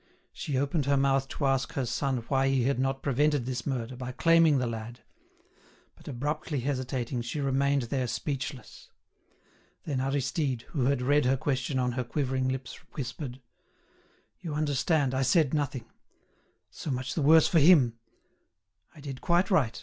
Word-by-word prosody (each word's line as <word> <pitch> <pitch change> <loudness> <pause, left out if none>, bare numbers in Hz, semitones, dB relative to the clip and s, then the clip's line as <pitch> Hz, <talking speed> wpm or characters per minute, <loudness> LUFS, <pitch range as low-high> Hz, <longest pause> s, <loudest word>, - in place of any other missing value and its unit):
She 140 -3 -3
opened 140 +1 0
her 140 0 +3
mouth 135 0 +2
to 140 - -3
ask 135 -1 +1
her 135 - -1
son 125 0 -2
why 135 0 +2
he 135 -2 +2
had 135 +1 +1
not 135 +1 -1
prevented 145 -1 +1
this 125 0 -4
murder 130 -2 -3
by 125 0 -6
claiming 165 -1 +4
the 130 - 0
lad; 115 +1 -6 0.9
but - - -19
abruptly 145 +2 -3
hesitating 130 -2 -2
she 120 +6 -4
remained 140 0 +1
there 125 +2 -2
speechless. 130 0 -5 0.9
Then 135 -4 -2
Aristide, 135 -1 -1
who 135 -6 -1
had 135 -1 +1
read 145 +1 +3
her 130 +1 +3
question 130 0 -1
on 125 -1 +1
her 125 +1 -2
quivering 130 0 -1
lips, 130 -2 -4 0.2
whispered: 130 -1 -6 1.0
"You 165 -5 -5
understand, 145 -1 +1
I 130 - 0
said 135 +2 +3
nothing—so 140 +1 -7
much 130 -1 -2
the 160 - -1
worse 160 +2 +6
for 170 - +3
him! 140 -8 +5 1.0
I 150 - -13
did 135 -3 -7
quite 175 +4 +2
right. 135 -12 +2
135 Hz, 155 wpm, -28 LUFS, 125-145 Hz, 1.0 s, worse